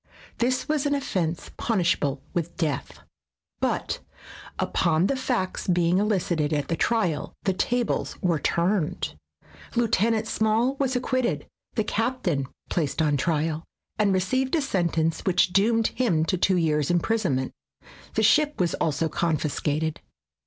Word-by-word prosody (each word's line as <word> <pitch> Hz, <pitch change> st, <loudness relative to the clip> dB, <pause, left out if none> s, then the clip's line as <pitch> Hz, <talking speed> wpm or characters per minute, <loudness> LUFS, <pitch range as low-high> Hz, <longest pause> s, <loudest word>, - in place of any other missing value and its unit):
This 255 Hz, +3 st, +1 dB
was 300 Hz, -2 st, +1 dB
an 285 Hz, -, +2 dB
offense 175 Hz, -, -2 dB
punishable 175 Hz, -, 0 dB
with 170 Hz, -1 st, -3 dB
death, 155 Hz, -7 st, -2 dB, 0.6 s
but -, -, -1 dB, 0.6 s
upon 165 Hz, +1 st, +2 dB
the 275 Hz, -, +1 dB
facts 245 Hz, -8 st, -2 dB
being 175 Hz, 0 st, +3 dB
elicited 175 Hz, -7 st, +1 dB
at 145 Hz, -2 st, -1 dB
the 165 Hz, -, +1 dB
trial 180 Hz, -8 st, 0 dB
the 190 Hz, -, +1 dB
tables 240 Hz, +5 st, 0 dB
w^ere 170 Hz, -5 st, +1 dB
turned. 170 Hz, -1 st, 0 dB, 0.6 s
Lieutenant 225 Hz, -1 st, +2 dB
Small 220 Hz, +5 st, +2 dB
was 270 Hz, -2 st, 0 dB
ac 250 Hz, -, +1 dB
quitted, 240 Hz, -, 0 dB, 0.3 s
the 220 Hz, -, +2 dB
captain 205 Hz, -, -1 dB, 0.2 s
placed 155 Hz, -4 st, -1 dB
on 150 Hz, -2 st, +3 dB
trial, 155 Hz, +2 st, 0 dB, 0.4 s
and 205 Hz, -2 st, +3 dB
received 255 Hz, -, +1 dB
a 320 Hz, -, +2 dB
sentence 165 Hz, -, 0 dB
which 185 Hz, 0 st, +2 dB
doomed 225 Hz, +3 st, +3 dB
him 175 Hz, -11 st, +1 dB
to 175 Hz, -, +1 dB
two 185 Hz, +1 st, +2 dB
years' 150 Hz, -4 st, +1 dB
imprisonment. 175 Hz, -7 st, +1 dB, 0.6 s
The -, -, +2 dB
ship 300 Hz, -1 st, +4 dB
was 175 Hz, -3 st, +1 dB
also 160 Hz, +1 st, 0 dB
confiscated. 155 Hz, -1 st, -1 dB
180 Hz, 135 wpm, -25 LUFS, 160-230 Hz, 0.6 s, ship